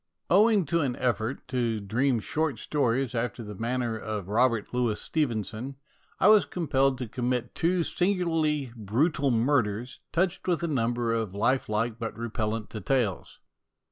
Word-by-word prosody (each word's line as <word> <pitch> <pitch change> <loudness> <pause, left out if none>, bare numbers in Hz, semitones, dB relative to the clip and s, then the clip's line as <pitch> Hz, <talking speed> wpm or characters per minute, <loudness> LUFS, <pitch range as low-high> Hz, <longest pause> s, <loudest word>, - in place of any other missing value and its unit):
Owing 205 0 +5
to 165 +3 +1
an 130 -4 0
effort 120 0 -2
to 120 -4 0
dream 120 +6 +1
short 150 +3 -1
stories 130 0 0
after 120 0 -2
the 105 -1 -7
manner 115 +2 -2
of 105 -4 -5
Robert 115 0 +1
Louis 120 -4 0
Stevenson, 120 - -2 0.4
I - - +5
was 215 -2 +7
compelled 135 -6 +1
to 125 -1 -4
commit 125 +1 -2
two 175 +1 +1
singularly 165 -8 0
brutal 135 - +1
murders, 120 -2 +1
touched 180 +3 0
with 175 -2 +1
a - - +1
number 120 -4 0
of 110 -4 -2
lifelike 115 0 0
but 115 -1 -4
repel 115 -2 -2
lent 110 -1 -3
details. 110 -2 -2
125 Hz, 145 wpm, -27 LUFS, 115-150 Hz, 0.4 s, was